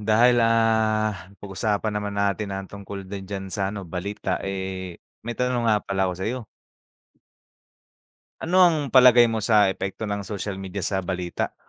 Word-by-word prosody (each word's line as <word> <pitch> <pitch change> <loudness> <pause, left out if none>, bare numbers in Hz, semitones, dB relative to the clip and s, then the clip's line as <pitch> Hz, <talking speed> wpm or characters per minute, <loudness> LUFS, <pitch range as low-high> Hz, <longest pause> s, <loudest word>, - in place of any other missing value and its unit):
dahil 115 +3 +4
ah, 110 -3 +2
napag-usapan 100 +2 -3
naman 105 -1 -3
natin 100 +1 0
ang 95 0 -4
tungkol 100 0 -8
din 95 0 -8
diyan 100 -1 -4
sa 95 0 -1
ano 100 -1 -6
balita 90 +2 -3
eh, 95 -2 -5 0.2
may 120 0 -6
tanong 125 -2 0
nga 105 -2 +2
pala 95 -1 0
ako 90 - -3
sa'yo. 115 +4 -4 1.9
Ano 185 +3 +2
ang 175 -3 +6 0.2
palagay 125 -2 +8
mo 110 - -1
sa 105 -2 +4
epekto 95 +4 -5
ng 100 -1 -2
social 100 -1 -5
media 95 0 -5
sa 95 -1 0
balita? 90 -1 -3
100 Hz, 155 wpm, -24 LUFS, 95-110 Hz, 1.9 s, palagay